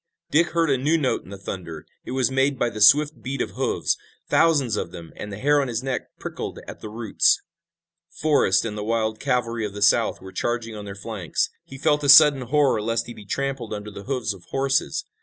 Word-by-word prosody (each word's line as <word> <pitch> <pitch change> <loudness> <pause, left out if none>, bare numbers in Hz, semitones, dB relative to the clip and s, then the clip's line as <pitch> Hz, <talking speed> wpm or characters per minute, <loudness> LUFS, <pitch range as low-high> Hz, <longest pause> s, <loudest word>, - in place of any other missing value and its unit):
Dick 165 +4 +4
heard 165 -3 +2
a 135 - +2
new 155 +5 +2
note 140 -5 0
in - - -15
the 100 - -8
thunder. 85 -5 -7 0.2
It - - -5
was 130 -2 +1
made 135 +1 +1
by 120 - 0
the 110 - -6
swift 145 +3 +5
beat 135 +2 -4
of - - -2
hoofs, - - -1 0.3
thousands 145 -9 +3
of 85 - -3
them, 85 -2 -10
and 105 - -7
the 100 - -6
hair 145 +5 +3
on 135 - -2
his 120 0 -3
neck 135 -1 -4
prickled - - -6
at - - -9
the 105 - -7
roots. 110 0 +2 0.7
Forrest 145 -11 +2
and 105 -2 -4
the 105 - -4
wild 110 0 -1
cavalry 120 -2 -1
of 105 -1 -4
the 105 - -6
South - - +3
were 95 0 -11
charging 115 +3 -3
on 105 -1 -7
their 100 -1 -7
flanks. 100 -5 -3
He 135 - -10
felt 150 +1 +1
a 140 - +1
sudden 145 -1 +8
horror 135 -2 +2
lest 115 +1 -1
he 120 - -8
be 105 - -13
trampled 135 -2 -3
under 105 0 -7
the 100 0 -10
hoofs 125 -6 -2
of 95 -3 -15
horses. 135 - 0
120 Hz, 225 wpm, -23 LUFS, 105-135 Hz, 0.7 s, sudden